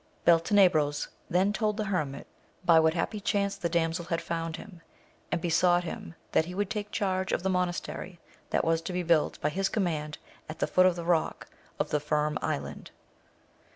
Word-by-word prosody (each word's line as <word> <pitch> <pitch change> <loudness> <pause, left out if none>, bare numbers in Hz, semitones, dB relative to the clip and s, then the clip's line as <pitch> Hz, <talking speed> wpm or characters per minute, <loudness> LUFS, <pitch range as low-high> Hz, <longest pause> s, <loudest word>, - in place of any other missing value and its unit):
Beltene 175 +4 +6
bros 145 -4 0 0.2
then 190 +4 +2
told 215 -1 0
the 215 - 0
hermit 150 -8 -2 0.4
by 165 -2 +7
what 160 +1 +3
happy 210 +5 -1
chance 200 -1 0
the 170 - -2
damsel 165 0 0
had 165 0 -1
found 165 -1 -3
him, 185 -6 -11 0.5
and - - +1
besought 175 +1 +3
him 165 0 -7 0.2
that 160 - +3
he 180 +2 -7
would 205 +1 -1
take 210 -1 -3
charge 190 -3 -1
of - - 0
the 190 - +1
monastery 180 0 -3 0.3
that - - +1
was 165 0 +2
to 180 - -5
be 180 0 -1
built 165 -3 +2
by 150 - +1
his 190 +5 0
command 155 -7 -2 0.3
at 155 - -6
the - - +1
foot 185 0 +4
of 180 - +2
the 170 -1 -5
rock 170 -2 0 0.3
of - - -2
the 150 - +2
Firm 150 0 0
Island. - - -4
175 Hz, 190 wpm, -29 LUFS, 165-190 Hz, 0.5 s, by